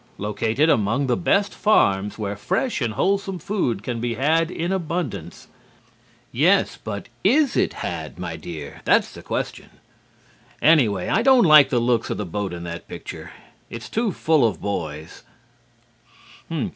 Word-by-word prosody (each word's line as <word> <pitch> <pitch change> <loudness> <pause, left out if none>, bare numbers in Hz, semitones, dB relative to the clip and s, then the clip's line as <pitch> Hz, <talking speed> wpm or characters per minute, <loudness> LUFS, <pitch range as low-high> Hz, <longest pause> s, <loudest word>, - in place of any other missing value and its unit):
Located 110 +8 0
among 120 0 +2
the 125 -2 +1
best 200 +3 +1
farms 100 - +2
where 105 -2 -3
fresh 250 - -1
and 115 -3 -1
wholesome 195 - 0
food 155 - -2
can 120 -1 -4
be 120 -1 -2
had 160 +6 +2
in 175 0 -3
abundance' 160 - -4 0.8
yes 175 +10 +3
but 100 -1 -5 0.2
is 270 +6 +3
it - - +1
had, - - -5
my 85 -2 -5
dear? 80 -3 -8
That's - - +3
the - - -11
question. - - -4 0.9
Anyway, 120 - +3
I - - +2
don't 260 -1 +5
like 155 -3 +7
the 125 - +1
looks 120 -1 +1
of - - -2
the 105 - -3
boat 100 +3 -3
in 85 -1 -7
the 85 0 -6
picture. - - -8 0.4
It's 115 -1 -8
too 225 -1 0
full 160 -5 +2
of 110 -4 +1
boys." 80 -6 -5
120 Hz, 150 wpm, -22 LUFS, -, 0.9 s, like